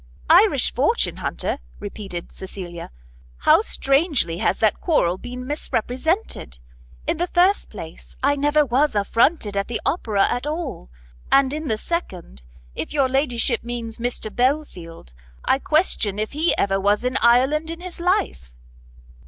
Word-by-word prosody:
"Irish 60 -1 +5
fortune - - +1
hunter?" - - -3 0.2
repeated 195 -4 -7
Cecilia, 180 -3 -8 0.5
"how - - +5
strangely 275 - +1
has - - +1
that 220 -2 +2
quarrel 185 - +1
been 250 +1 -7
misrepresented! 265 - -2 0.5
In - - 0
the 350 +2 -1
first 365 +3 +2
place, 165 -6 -10
I 285 +1 +3
never 295 +1 +2
was 270 +1 +1
affronted 210 +2 +1
at 200 0 -1
the 235 - -3
Opera 215 - +1
at 245 +4 -2
all, 305 - -5 0.4
and 275 0 +4
in 310 0 -4
the 220 -4 0
second, 65 - -5 0.3
if - - -5
your 280 -3 +3
Ladyship 255 -3 0
means 235 -1 -5
Mr 235 -2 -3
Belfield, 240 - -2 0.3
I 265 - +2
question 290 - +1
if 215 +1 -2
he 315 +4 +2
ever 195 -1 +1
was 205 +3 +1
in 250 +1 -1
Ireland 265 +7 +3
in 330 0 -6
his 360 -1 -8
life." 350 - -1
245 Hz, 145 wpm, -22 LUFS, 200-300 Hz, 0.5 s, Irish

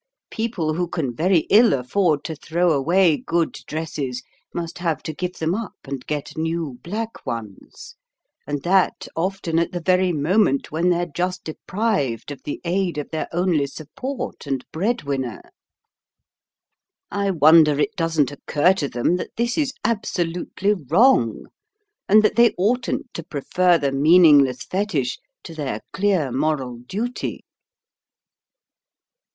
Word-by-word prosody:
People 215 -9 -2
who 175 +2 -1
can 150 -8 -3
very 175 +4 +3
ill 225 +3 +6
afford 145 +4 +1
to 160 - -5
throw 170 +3 0
away 160 +3 +3
good 170 -1 -1
dresses 145 -5 -4 0.3
must 170 0 -5
have 165 -3 -1
to 160 - -4
give 180 +3 -4
them 160 +1 0
up, 220 0 -4
and 135 -2 -7
get 150 -2 -4
new 160 -5 -3
black 220 - -5
ones, 110 -4 -8 0.5
and 145 -1 -3
that 185 +1 +2
often 170 -1 -1
at 170 +2 -1
the 175 - -2
very 185 +1 +2
moment 155 -1 +1
when 165 +4 +1
they're 175 0 +1
just 180 +3 -3
deprived 155 - -2
of 145 - -8
the 145 - -4
aid 180 -1 0
of 150 - -5
their 160 - -3
only 170 -5 +1
support 155 - -6
and 135 -2 -2
bread 220 +9 -1
winner. 135 -3 -3 1.7
I 200 -1 0
wonder 155 -3 +5
it 210 +8 0
doesn't 165 -6 +1
occur 145 +5 +2
to 145 -7 -3
them 125 +9 +1
that - - -7
this 235 +1 0
is 295 -5 0
absolutely 195 -2 -1
wrong, 165 - +3 0.6
and 215 +2 +7
that 215 - +2
they 235 -1 +5
oughtn't 240 +5 -1
to - - -5
prefer 175 +3 +1
the 140 -3 -1
meaningless 145 -3 +5
fetich 205 - -2 0.2
to 165 - -9
their 140 -9 -4
clear 185 -9 +1
moral 135 -2 -1
duty." 215 - -4
165 Hz, 140 wpm, -22 LUFS, 145-190 Hz, 1.7 s, and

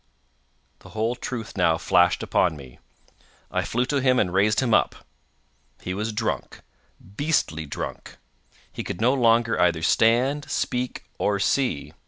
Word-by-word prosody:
The - - -15
whole 110 +2 +1
truth 125 -2 -6
now 85 -4 +2
flashed 90 +1 +2
upon 85 -4 +1
me. 65 -3 -13 0.7
I - - 0
flew 120 +2 -1
to 140 +1 -1
him 130 -1 +3
and 90 -6 +1
raised 100 +3 +3
him 120 -4 +1
up. - - +3 0.8
He 90 - -5
was 105 +4 -3
drunk—beastly 100 - -4
drunk—he - - -9
could 85 - -6
no 125 +4 +3
longer 115 -3 +3
either 85 -2 +2
stand, 125 - +2
speak, 125 0 -2 0.2
or 100 -1 +1
see. 120 - 0
110 Hz, 135 wpm, -24 LUFS, 90-125 Hz, 0.8 s, him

